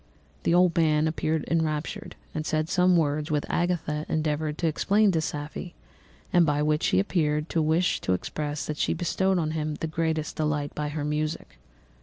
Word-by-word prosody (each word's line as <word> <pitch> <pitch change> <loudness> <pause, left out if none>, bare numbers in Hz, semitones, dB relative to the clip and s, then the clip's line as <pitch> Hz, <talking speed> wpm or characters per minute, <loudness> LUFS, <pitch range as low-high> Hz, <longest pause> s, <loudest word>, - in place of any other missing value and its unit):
The - - +1
old 180 -1 +4
man 155 -2 +3
appeared 160 -1 -1
enraptured 160 -2 -2 0.2
and 155 - -2
said 155 0 -1
some 180 0 +4
words 150 -1 0
which 150 -2 0
Agatha 165 -4 -1
endeavoured 155 -1 -1
to - - -2
explain 200 +6 +3
to 165 -3 +1
Safie, 145 - -5 0.6
and 175 - +6
by 150 -2 +1
which 150 0 +1
he 90 - +3
appeared 150 - 0
to 165 - +1
wish 160 +4 +1
to 95 - +1
express 150 +10 -3
that 150 - -4
she - - 0
bestowed 190 +2 +1
on 155 -3 0
him 155 -1 -2
the 160 - -4
greatest 160 -1 -2
delight 150 -2 -1
by 150 0 -3
her 145 0 -3
music. 150 +1 -3
155 Hz, 180 wpm, -26 LUFS, 150-165 Hz, 0.6 s, and